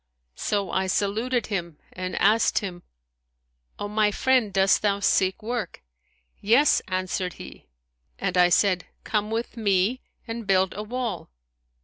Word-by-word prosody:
So 200 -2 -1
I 190 0 0
saluted 220 +6 0
him 170 -7 -4 0.2
and 185 0 -5
asked 215 +3 +3
him, 180 -4 -3 1.0
O 205 - -4
my 210 0 +2
friend, 250 0 +2
dost 195 0 +3
thou 200 -1 +1
seek 190 0 +1
work?' 225 - -4 0.6
Yes,' 240 +9 +4
answered 185 -1 -2
he; - - -12 0.5
and 190 -2 -2
I 180 -1 +5
said, 180 -1 +2 0.2
Come 210 -1 -1
with 230 +2 -3
me 205 +3 +1 0.3
and 225 -2 -6
build 190 -1 +2
a 210 - -4
wall.' 230 -4 -4
200 Hz, 135 wpm, -25 LUFS, 185-225 Hz, 1.0 s, I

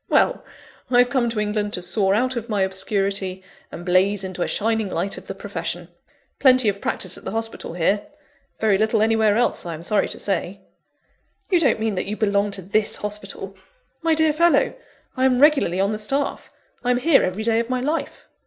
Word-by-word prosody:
Well, - - +2 0.5
I 245 - +3
have 245 0 +4
come 245 -3 +1
to 230 -2 -3
England 210 0 -1
to 180 - -2
soar 195 +2 +2
out 255 +3 0
of 235 0 -5
my 205 -3 +1
obscurity 190 0 -1 0.3
and 175 - -8
blaze 190 +2 +2
into 185 -1 -6
a - - +1
shining 220 -1 0
light 185 +3 -2
of - - -19
the 195 - -5
profession. 175 -3 -5 0.5
Plenty 255 -3 +5
of 200 0 -4
practice 185 -1 -3
at - - -21
the - - -4
hospital, 225 -4 -4
here 195 +4 0 0.5
very 210 -3 +2
little 220 0 +2
anywhere 220 -1 +3
else, 245 - +1
I 170 -2 -5
am 160 - -10
sorry 210 +4 +1
to - - -6
say." 195 0 -3 0.9
"You 360 - +5
don't 280 -8 +2
mean 220 -1 -1
that 185 - -3
you 210 +1 -3
belong 205 -1 +1
to 195 -1 -2
this 210 +4 0
hospital?" 200 -2 -4 0.5
"My 325 -1 +2
dear 315 -1 +3
fellow, 340 +2 +3 0.4
I 260 - +1
am 255 -1 +3
regularly 280 - +4
on 200 +2 +2
the 215 - -3
staff; 275 +7 -2 0.3
I'm 245 -1 +2
here 280 +3 +4
every 185 +4 -2
day 225 0 +2
of 235 +1 -3
my 255 0 0
life." 300 +6 -3
210 Hz, 200 wpm, -22 LUFS, 195-245 Hz, 0.9 s, Plenty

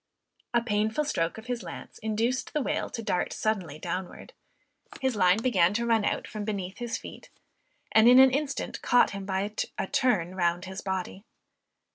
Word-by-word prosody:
A 235 -1 +2
painful 220 +5 0
stroke 165 - -1
of 220 - -10
his 245 -2 -3
lance - - -9
induced 225 +4 -1
the 300 - +1
whale - - -1
to 230 - -6
dart 200 -5 -1
suddenly 185 -9 -2
downward; 180 +3 -6 0.7
his 260 -3 0
line 185 -1 +4
began 205 -6 +2
to 235 +2 0
run 225 -2 +2
out - - -1
from 215 -1 -5
beneath 195 -3 -4
his 240 -1 -3
feet, - - -11 0.6
and 220 +2 +6
in 250 - +8
an 265 0 +8
instant 280 +1 -2
caught 245 - +4
him 200 -1 -6
by 195 +2 -1 0.2
a - - -1
turn 190 -6 +1
round 175 0 0
his 190 +1 -6
body. 190 0 -4
215 Hz, 175 wpm, -28 LUFS, 190-240 Hz, 0.7 s, in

